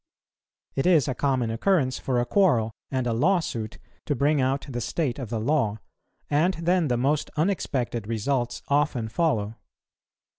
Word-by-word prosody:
It 135 - 0
is 160 -7 +4
a 130 - 0
common 130 -4 0
occurrence 130 - +1
for 125 -2 0
a 120 - +1
quarrel 125 - +3 0.2
and 130 -2 -1
a 120 - 0
lawsuit 120 - 0 0.3
to 145 - +1
bring 145 +2 +2
out 135 +2 0
the 120 -3 -4
state 140 +1 -2
of 125 -5 -5
the 115 -1 -2
law, 115 -4 +1 0.5
and 165 +6 +2
then 170 0 +1
the 125 -2 +1
most 140 +4 0
unexpected 130 - -1
results 120 +2 -1
often 140 -6 +1
follow. 110 -6 0
135 Hz, 155 wpm, -25 LUFS, 120-155 Hz, 0.5 s, is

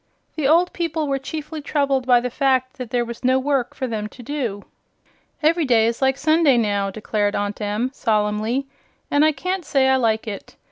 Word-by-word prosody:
The 300 -4 0
old 340 +4 +3
people 325 -3 -2
were 275 -1 0
chiefly 305 +2 -6
troubled 280 -3 0
by 245 -1 +5
the 250 0 -3
fact 260 0 0
that 250 -3 -5
there 240 -1 0
was 235 +1 -8
no 255 +1 +3
work 265 -2 -1
for 265 - -3
them 220 -4 -3
to 245 +3 -13
do. 235 -7 -4 0.8
"Ev'ry 330 +2 +3
day 235 -5 +3
is 230 +2 -1
like 265 0 +2
Sunday, 310 -2 +3
now," 205 -3 0
declared 205 0 -1
Aunt 205 +1 -3
Em, 210 +5 -1
solemnly, 215 +2 0 0.5
"and 290 +1 +4
I 310 - +5
can't 365 +6 -3
say 275 -3 +2
I 265 0 +4
like 225 -3 0
it. 200 -2 -7
260 Hz, 195 wpm, -21 LUFS, 225-290 Hz, 0.8 s, by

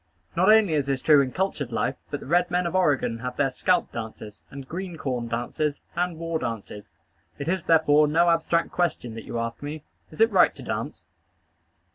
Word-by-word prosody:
Not 185 +5 +5
only 215 -6 +5
is 145 -3 0
this 135 -1 0
true 150 -3 +6
in 130 -2 -2
cultured 155 -8 -2
life, 125 +3 -1
but 145 - -4
the - - -9
red 175 +5 +2
men 180 0 0
of 170 - -2
Oregon 145 -10 +1
have 125 +1 -5
their 135 -2 +1
scalp 180 +7 +1
dances, 110 -2 -8
and 135 -1 -9
green 180 +1 -6
corn 125 -5 -3
dances, 125 +5 -2 0.2
and 175 -1 -1
war 165 0 -2
dances. 110 -4 -6 0.5
It 140 - -6
is, 185 +1 -1
therefore, 155 -2 +4
no 170 +3 +3
abstract 165 0 +1
question 170 -9 -1
that 115 - -8
you - - -5
ask 115 0 -4
me 150 +1 -6 0.3
Is - - -14
it 450 - +5
right - - +4
to - - -10
dance? - - -5
150 Hz, 200 wpm, -25 LUFS, 125-170 Hz, 0.5 s, true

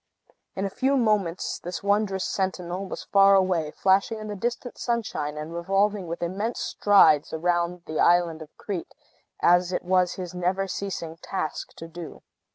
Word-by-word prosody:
In 195 - -2
a 195 - -3
few 275 +5 +1
moments, 210 -7 0
this 180 +3 -6
wondrous 200 -2 +1
sentinel 185 0 -2
was - - -6
far 195 0 +5
away, 185 -5 +2
flashing 195 +7 +2
in 215 0 -7
the 205 - -4
distant 240 +4 -4
sunshine, 160 -11 -2
and 155 +2 -6
revolving 195 +2 0
with 170 +1 -4
immense 200 +7 -2
strides 160 -8 +4
round 175 +1 -1
the 155 - -4
island 170 -2 +3
of 155 - -9
Crete, 190 -5 -5 0.5
as 175 +1 +4
it 180 - -2
was 180 0 +2
his 180 -2 -6
never 185 +2 -1
ceasing 170 -5 -5
task 165 -2 -4
to 165 - -9
do. 165 0 -9
185 Hz, 165 wpm, -25 LUFS, 170-200 Hz, 0.5 s, far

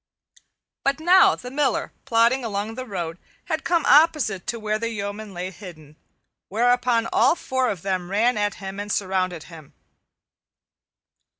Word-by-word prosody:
But 275 +2 +1
now 360 +3 +5
the 250 - -9
Miller, 275 -2 0
plodding 240 +1 +3
along 210 0 -3
the 255 +2 -7
road, 175 -4 -5 0.3
had - - -2
come 340 -2 +1
opposite 290 - +3
to 235 - -3
where 215 0 -2
the 230 0 -2
yeomen 205 -1 -5
lay 180 0 -5
hidden, 160 -6 -12 0.5
whereupon 240 +1 +2
all - - +4
four 260 -6 -1
of 185 -5 -5
them 185 -2 -2
ran 230 +5 +2
at 205 -1 -1
him 195 0 -7
and 205 0 -4
surrounded 185 -4 -1
him. 160 -5 -14
215 Hz, 145 wpm, -23 LUFS, 190-250 Hz, 0.5 s, now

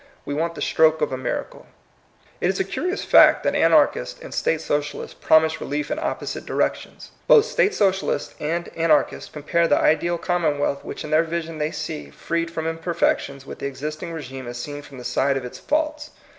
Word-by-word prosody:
We 145 - -3
want 165 +3 -1
the - - -3
stroke 160 0 +3
of 150 - +1
a - - -1
miracle. 130 - -5 0.7
It 175 - +1
is 190 - -1
a - - +3
curious 360 - -3
fact - - +6
that - - +1
Anarchists - - +3
and - - -9
State 485 - +1
Socialists 145 0 -3
promise 160 0 +3
relief 145 +1 -3
in - - -1
opposite - - -3
directions. - - -3 0.2
Both 435 - +7
State 450 -4 +1
Socialists 190 -2 0
and 170 +3 -2
An 165 0 0
archists 150 -1 +2
compare 170 +3 0
the 145 - +4
ideal 170 +3 +2
commonwealth 155 -5 0
which - - -6
in 150 - -7
their 155 +1 +5
vision 165 -1 -4
they 150 0 0
see, 75 - -5
freed 170 - -3
from 160 -1 -4
imperfections, 165 -4 -1
with - - -9
the - - -2
existing 150 +5 -5
rSgime 135 -5 -7
as 120 0 -6
seen 145 +3 -6
from 145 -2 -13
the 125 - -9
side 135 +2 +1
of 130 - -5
its 125 - -8
faults. 305 0 -1
160 Hz, 195 wpm, -23 LUFS, 145-170 Hz, 0.7 s, Both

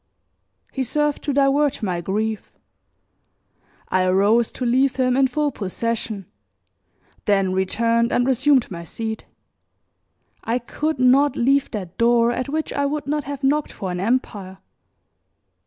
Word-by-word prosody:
He 265 - -3
served 295 +3 -1
to 290 - 0
divert 280 -1 +2
my 180 -4 -1
grief; 215 +4 -3 1.4
I 185 0 +2
arose 205 +5 +3
to 255 - -4
leave 260 +2 +2
him 255 -1 +1
in 270 0 +4
full 295 +3 -1
possession, 215 0 -4 1.0
then 195 -2 +2
returned 230 +5 +1
and 245 - +2
resumed 265 -1 +2
my 170 -2 -6
seat. 220 +5 -6 1.2
I 230 +2 0
could 300 +5 -3
not 260 +3 +4
leave 275 +3 +2
that 185 -5 -7
door 235 0 +4
at 255 +2 -3
which 310 +2 -2
I 285 - 0
would 295 +1 -3
not 295 0 -2
have 285 0 -6
knocked 290 +2 +1
for 190 -2 -5
an 180 - -4
empire. 200 -3 -2
240 Hz, 140 wpm, -22 LUFS, 205-275 Hz, 1.4 s, in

